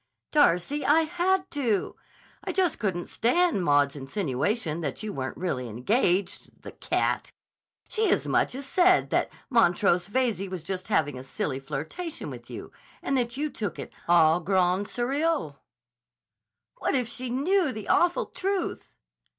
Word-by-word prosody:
"Darcy, 285 - +3
I 310 +3 +5
had 360 +3 0
to! 235 -9 -1 0.5
I - - -2
just 365 -5 +1
couldn't 185 -5 -1
stand 255 - +2
Maud's 145 -2 +3
insinuation 155 - -2
that 145 +5 -4
you 215 -1 -4
weren't 130 -1 -4
really 130 -9 -3
engaged—the 180 - -1
cat! - - -1 0.6
She 440 0 +1
as - - +1
much - - +1
as 275 +1 -6
said 360 +5 +3
that - - +1 0.2
Montrose 180 -5 +3
Veyze 215 -4 0
was 185 -4 -6
just 185 +2 -4
having 145 -10 +1
a - - -8
silly 135 +1 -3
flirtation 160 - -5
with - - -10
you - - -8 0.3
and 275 - 0
that 240 -1 -1
you 300 +1 -2
took 205 -7 -4
it - - -8 0.2
au 165 -1 +5
grand 185 +2 +1
sérieux." 270 - -1 1.2
"What - - 0
if 250 -3 +1
she 250 +1 -3
knew 305 +6 +1
the 215 -3 -7
awful 350 0 +3
truth?" 385 -1 -3
210 Hz, 145 wpm, -27 LUFS, -, 1.2 s, I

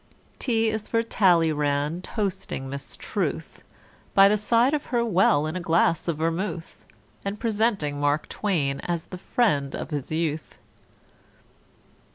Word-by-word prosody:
=T= 225 -3 +1
is 215 -1 -4
for 230 0 +1
=T=alleyrand 160 -6 +2
toasting 190 - -3
Miss 140 +1 -6
=T=ruth, - - -3 0.5
By 195 0 +8
the 210 - +3
side 230 +5 +3
of 300 -1 -1
her 235 -2 0
well, 180 -8 +3
in 155 +2 -3
a - - -1
glass 165 -1 +2
of 165 -3 -1
vermouth, 165 +2 -3 0.4
And 200 +1 -4
presenting 210 -10 0
Mark 145 +1 +1
=T=wain 150 -10 -1
as 170 -2 -3
the 185 - -9
friend 150 - +1
of - - -6
his 145 -2 -4
youth. 155 -1 -2
175 Hz, 140 wpm, -25 LUFS, 150-210 Hz, 0.5 s, By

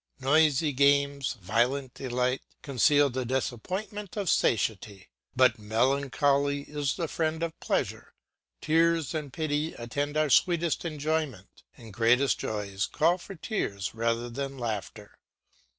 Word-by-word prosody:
Noisy 150 +2 +3
games, 140 0 +2
violent 120 +7 0
delight, 125 0 -1 0.2
conceal 145 +1 +3
the 130 +1 -2
disappointment 185 - -4
of 200 -4 +1
satiety. 100 -3 0 0.3
But 125 -3 +4
melancholy 140 +5 +1
is 145 -2 -2
the 170 -3 -2
friend 160 +1 -1
of 165 -1 -4
pleasure; - - -2 0.5
tears 165 -1 +2
and 150 -4 -4
pity 150 +1 -2
attend 145 +5 -3
our 155 -2 +2
sweetest 170 +1 +2
enjoyment, 155 - -3 0.2
and 115 -4 -12
great 115 +3 +4 0.2
joys 105 -1 -3
call 170 +4 +2
for 195 +2 -9
tears 100 - -3
rather 115 +1 -1
than 135 +3 -5
laughter. 110 -3 -5
140 Hz, 120 wpm, -28 LUFS, 120-155 Hz, 0.5 s, But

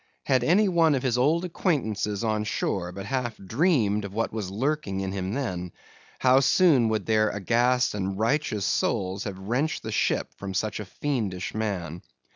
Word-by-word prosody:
Had 130 -3 +2
any 190 +10 +4
one 165 -5 +3
of 130 - -2
his 125 -3 +1
old 155 +8 +2
acquaintances 110 - -1
on 110 -1 0
shore 95 -3 -2
but 95 +1 -7
half 125 -2 -2
dreamed 110 - +1
of 100 0 -7
what 115 -1 -1
was 105 -4 -3
lurking 115 -2 -1
in 95 -1 -3
him 95 +2 -3
then, 90 -10 -3 0.5
how 130 0 +5
soon 135 -4 +4
would 110 -3 -1
their 110 -1 +3
aghast 120 +5 +1
and 95 -1 -3
righteous 110 -3 0
souls 95 +1 0
have 100 -3 -5
wrenched 120 +11 -2
the 110 - -4
ship - - 0
from 95 -1 -6
such 105 +2 -1
a 105 - -5
fiendish 105 -6 -3
man! 90 -6 -3
110 Hz, 175 wpm, -26 LUFS, 100-135 Hz, 0.5 s, how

